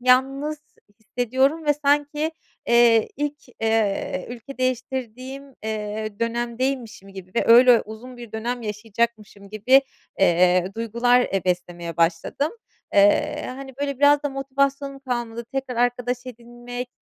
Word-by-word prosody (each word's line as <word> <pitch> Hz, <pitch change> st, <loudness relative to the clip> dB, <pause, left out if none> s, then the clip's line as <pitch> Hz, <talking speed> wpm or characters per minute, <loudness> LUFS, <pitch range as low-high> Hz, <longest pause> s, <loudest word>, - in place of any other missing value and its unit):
yalnız 270 Hz, +4 st, +2 dB, 0.4 s
hissediyorum 260 Hz, +7 st, 0 dB
ve 295 Hz, -, +4 dB
sanki, 295 Hz, +2 st, +1 dB, 0.3 s
eee, 235 Hz, -2 st, +5 dB
ilk, 295 Hz, 0 st, -2 dB, 0.3 s
ııı, 215 Hz, -4 st, 0 dB
ülke 245 Hz, +3 st, -9 dB
değiştirdiğim, 255 Hz, +1 st, -3 dB
ııı, 215 Hz, -4 st, -5 dB
dönemdeymişim 235 Hz, -2 st, -2 dB
gibi 190 Hz, -1 st, -11 dB
ve -, -, +2 dB
öyle 240 Hz, +1 st, +8 dB
uzun 240 Hz, +4 st, -10 dB
bir 235 Hz, -3 st, -10 dB
dönem 240 Hz, +2 st, -3 dB
yaşayacakmışım 215 Hz, -1 st, -3 dB
gibi, 255 Hz, +6 st, +4 dB, 0.4 s
eee, 180 Hz, -1 st, +4 dB
duygular, 235 Hz, +2 st, +3 dB
eee, 195 Hz, -6 st, -1 dB
beslemeye 175 Hz, -2 st, -3 dB
başladım. 170 Hz, -, 0 dB, 0.4 s
Eee, 200 Hz, 0 st, +4 dB
hani, 265 Hz, 0 st, -8 dB
böyle 280 Hz, -2 st, -2 dB
biraz 290 Hz, 0 st, +5 dB
da 290 Hz, -, 0 dB
motivasyonum 275 Hz, 0 st, -1 dB
kalmadı 240 Hz, -3 st, -4 dB
tekrar 265 Hz, -3 st, -3 dB
arkadaş 245 Hz, +1 st, 0 dB
edinmek, 240 Hz, +1 st, -8 dB
240 Hz, 120 wpm, -23 LUFS, 220-270 Hz, 0.4 s, öyle